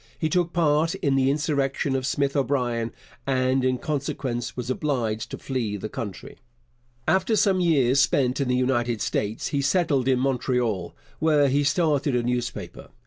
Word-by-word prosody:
He 160 - -1
took 175 +1 +1
part 160 -1 +2
in 140 -2 0
the 135 0 +3
insurrection 140 -2 0
of 130 -1 -1
Smith 140 +1 0
O'Brien, 125 -5 0 0.4
and 130 0 +1
in 130 0 +1
consequence 130 -4 -3
was 125 0 -3
obliged 120 -6 -2
to - - -6
flee 115 -6 -3
the 110 - -6
country. 105 -6 -7 0.7
After 190 +4 +2
some 195 -3 +3
years 140 -7 +3
spent 135 -1 +2
in 135 - 0
the 125 - +1
United 120 -3 0
States, 105 +1 -2
he 140 - 0
settled 140 -3 +1
in 130 -1 +3
Montreal, 125 -7 -1 0.2
where 150 -3 +3
he 140 +2 +2
started 145 -4 +1
a 120 - +1
newspaper. 120 0 -4
135 Hz, 160 wpm, -25 LUFS, 125-145 Hz, 0.7 s, the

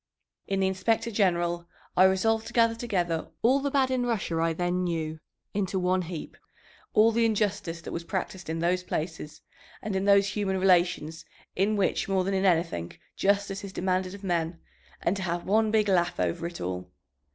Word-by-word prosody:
In 195 0 0
the 190 - +3
Inspector 225 +5 0
General 175 -4 +1 0.3
I 185 - +7
resolved 220 +4 +2
to - - -9
gather 230 -1 +4
together 180 -8 -1 0.2
all 260 +4 +5
the 280 +1 -1
bad 270 -2 +2
in 255 -1 +1
Russia 215 -9 -1
I 165 0 +2
then 175 +2 -1
knew 160 -3 -2 0.3
into 195 -1 -1
one 185 0 +1
heap, 170 -2 -7 0.6
all 220 +1 +6
the 230 +1 +2
injustice 205 -6 0
that - - -7
was 170 - -4
practised 190 -1 -4
in 160 - -2
those 175 +2 +1
places 160 -3 -5 0.4
and 210 -2 -4
in 190 +1 0
those 200 0 +5
human 195 -2 -1
relations 175 -3 +2 0.3
in 200 +3 +2
which 195 -1 0
more 190 -1 +2
than 195 +2 -1
in 190 0 +1
anything 165 - +1 0.2
justice 200 0 0
is 200 - -6
demanded 185 +1 -1
of 200 - -13
men, 170 -2 -1 0.4
and 175 - +2
to - - -4
have 175 -1 -2
one 220 +2 +3
big 215 -1 +2
laugh 175 -3 +1
over 90 - -1
it 170 - -8
all. 90 0 -4
190 Hz, 185 wpm, -27 LUFS, 170-205 Hz, 0.6 s, I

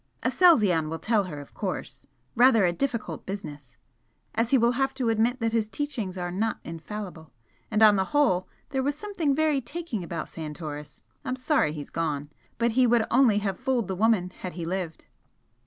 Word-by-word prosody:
"Aselzion 205 - +4
will 165 - -3
tell 215 +1 +1
her, 150 -5 -6
of 145 - -12
course. 180 -9 -4 0.3
Rather 240 -4 +6
a 175 - +2
difficult 245 +2 -3
business! 150 -10 -7 0.6
as 230 +1 0
he 270 - +5
will 235 0 +4
have 270 +2 0
to 250 -4 0
admit 230 +3 +2
that 225 -1 0
his 225 -2 +1
teachings 225 -8 -4
are 175 -1 -3
not 215 +5 -1
infallible. 165 -1 -7 0.4
And 215 0 +3
on 210 -2 +7
the 190 - +1
whole 185 -9 +2 0.2
there 265 - -1
was 280 +2 0
something 350 -9 -1
very 305 -2 +2
taking 265 - -5
about 170 -2 -4
Santoris 150 -2 -7 0.2
I'm 255 - -2
sorry 260 - +1
he's 150 -2 -7
gone. 150 -3 -2 0.3
But 235 0 +2
he 250 +2 +4
would 235 -1 +3
only 240 -4 +5
have 195 -2 -2
fooled 255 -5 0
the 190 - -2
woman 200 -3 +2
had 185 - -5
he 170 0 -5
lived." 175 -2 -4
215 Hz, 185 wpm, -27 LUFS, 175-255 Hz, 0.6 s, on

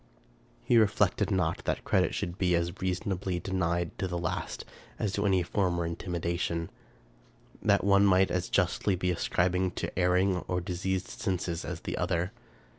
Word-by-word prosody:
He 120 - +5
reflected 105 -2 +2
not 90 -4 0
that - - -1
credit - - +2
should 85 +2 -4
be 90 -2 +3
as 85 +1 -1
reasonably 95 -1 -1
de 95 - -6
nied 85 -2 0
to 95 - 0
the 90 -1 -3
last 85 -2 -3 0.3
as 100 -3 -1
to 100 0 +1
any 95 -2 +3
former 85 -2 0
intimation; 85 -1 -2 0.9
that 100 -2 +3
one 100 0 +5
might 95 0 +4
as 90 -1 -1
justly 95 +1 +1
be 90 0 0
ascribed 90 +1 0
to - - -3
erring 90 +1 +3
or 90 - 0
diseased 95 +1 -2
senses 90 -4 -2
as - - -5
the - - -4
other. 85 +3 0
90 Hz, 160 wpm, -29 LUFS, 85-95 Hz, 0.9 s, He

